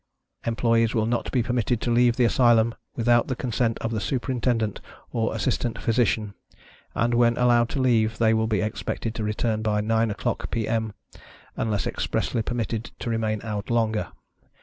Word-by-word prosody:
Employees 115 0 +2
will 110 -1 +2
not 120 +1 -1
be 125 -3 +1
permitted 120 -1 0
to 120 - -1
leave 120 0 +4
the 125 - +3
Asylum 115 -1 +4 0.2
without 120 0 +3
the 130 - -2
consent 120 -2 -1
of 115 - -2
the 110 -2 -2
Superintendent 120 -2 -1 0.3
or 115 -1 -1
Assistant 115 +2 -1
Physician, 110 -3 0 0.6
and, 120 +1 +1
when 120 0 +3
allowed 120 -1 +3
to - - -3
leave, 115 -4 +2
they 110 -1 +3
will 110 0 +1
be 110 -3 +1
expected 110 +1 -3
to 115 - -4
return 110 +1 -1
by 105 -1 +1
9 110 +1 +1
oâ€™clock 105 - -3
P.Â 115 -2 -2
M.â€"unless 110 -1 -5
expressly 115 - -1
permitted 115 -1 -3
to 120 - -4
remain 110 -2 -1
out 105 -2 -4
longer. 110 -2 +1
115 Hz, 165 wpm, -25 LUFS, 110-120 Hz, 0.6 s, leave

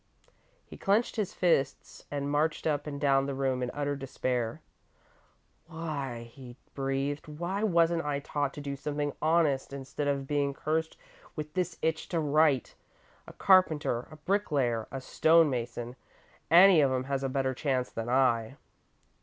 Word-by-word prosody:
He - - -12
clenched 210 +4 +1
his 210 -5 -2
fists 145 -6 0
and 140 -1 -3
marched 150 +2 0
up 150 -2 0
and 140 -1 -5
down 135 -1 +2
the 140 - -3
room 130 -1 -1
in 125 - -1
utter 145 0 -2
despair. 125 -4 -2 1.1
"Why," 150 -8 -5
he 125 -3 -11 0.2
breathed, 135 +2 -2
"why 175 +6 -4
wasn't 170 -5 +2
I 145 -1 -1
taught 145 0 -2
to 145 - -6
do 140 -1 -4
something 145 +1 -3
honest, 155 -5 +2
instead 140 +1 -4
of 140 -1 0
being 140 -1 0
cursed 160 +2 -2 0.4
with 150 -1 -6
this 180 -2 -2
itch 160 0 -1
to 170 - 0
write? 150 -3 +2 0.5
A - - -10
carpenter, 155 -10 +3
a 155 - -11
bricklayer, 145 - 0
a 135 - -5
stone 160 +3 +4
mason, 120 0 -4 0.5
any 175 0 +8
one - - +5
of 130 -1 +1
'em 130 - -2
has 135 0 -2
a 135 - -1
better 130 0 0
chance 130 -2 -1
than 115 +1 -4
I!" 125 -1 +2
145 Hz, 160 wpm, -29 LUFS, 135-160 Hz, 1.1 s, any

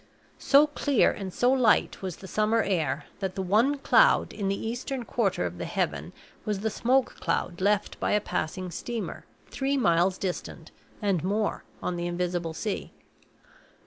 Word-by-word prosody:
So 285 +2 +6
clear 285 -4 +2
and 195 -2 -6
so 245 +7 +2
light 255 -5 +3
was 185 -3 -4
the 190 - -11
summer 215 +3 +2
air 155 -7 -1
that 190 -2 -3
the 190 - -2
one 225 +10 +3
cloud - - +4
in 200 -2 -3
the 195 0 -1
eastern 245 +2 -4
quarter 200 - 0
of 90 0 -5
the - - -3
heaven - - -2 0.3
was 210 -2 -2
the 220 0 -1
smoke 255 +5 +1
cloud 175 0 -2
left 205 +1 +1
by - - 0
a 210 - +4
passing 185 -1 -3
steamer 235 +4 -5 0.3
three 275 +1 0
miles 180 -4 +3
distant 185 -2 -5 0.3
and 195 -6 +1
more 205 +3 -1 0.2
on 180 - -2
the 175 0 -2
invisible 175 -2 -2
sea. 210 +4 -4
200 Hz, 165 wpm, -27 LUFS, 180-235 Hz, 0.3 s, So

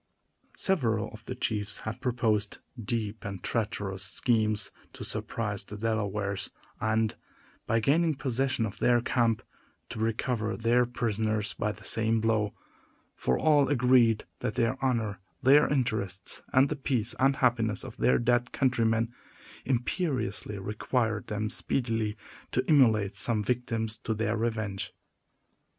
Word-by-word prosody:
Several 120 - +1
of 110 0 -12
the 130 - -5
chiefs 105 -4 -2
had 110 - -5
proposed 110 -5 +1 0.3
deep 110 0 -2
and 100 -2 -6
treacherous 100 -4 -2
schemes 110 +1 +1 0.2
to - - -8
surprise 100 -4 -2
the 105 - -8
Delawares 105 -3 -1 0.3
and, 110 0 +1 0.5
by 115 - +3
gaining 155 +7 +3
possession 130 -2 0
of 100 - -7
their 120 -1 +4
camp, 115 -2 +1 0.5
to - - -6
recover 110 0 -1
their 120 +2 +3
prisoners 110 -3 -1
by 105 - -1
the 105 0 -12
same 115 +2 +1
blow; 110 -2 +1 0.6
for 65 - 0
all 145 -3 +4
agreed 125 -4 +4 0.2
that 110 - -2
their 125 +2 0
honor, 115 -7 0 0.2
their 140 +3 +6
interests, 110 -9 -1
and 135 +1 +5
the 150 - -1
peace 125 -5 -1
and 135 +1 +4
happiness 115 -5 +1
of 130 -3 -8
their - - +4
dead 120 +1 +1
countrymen, 115 -2 +1 0.5
imperiously 125 - -1
required 110 +2 -1
them 105 0 -2
speedily 115 -2 -1 0.3
to - - 0
immolate 110 - +4
some 110 -3 +3
victims 115 -1 -1
to 110 - -2
their 110 +1 0
revenge. 110 -4 -2
115 Hz, 135 wpm, -29 LUFS, 105-125 Hz, 0.6 s, their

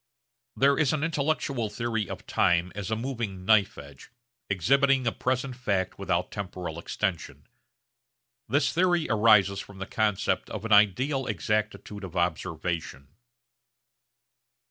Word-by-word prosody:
There 140 +1 +3
is 155 -1 +2
an 155 -1 -1
intellectual 145 -6 -1
theory 115 -2 -2
of - - -7
time 90 +1 +2
as 100 -2 -5
a 110 - 0
moving 115 -6 -4
knife 110 0 +3
edge, 70 -1 -12 0.4
exhibiting 135 - +3
a 120 - +2
present 130 0 -2
fact 100 -7 -2
without - - -1
temporal 90 -4 -5
extension. 95 0 -4 1.0
This 140 +4 +2
theory 175 -1 +2
arises 105 -3 +4
from 100 0 -10
the 95 - -5
concept 105 -2 0
of 110 - -6
an 115 - -4
ideal 125 +7 +3
exactitude 105 0 -2
of 95 -1 -8
observation. 85 -4 -2
105 Hz, 125 wpm, -27 LUFS, 95-130 Hz, 1.0 s, arises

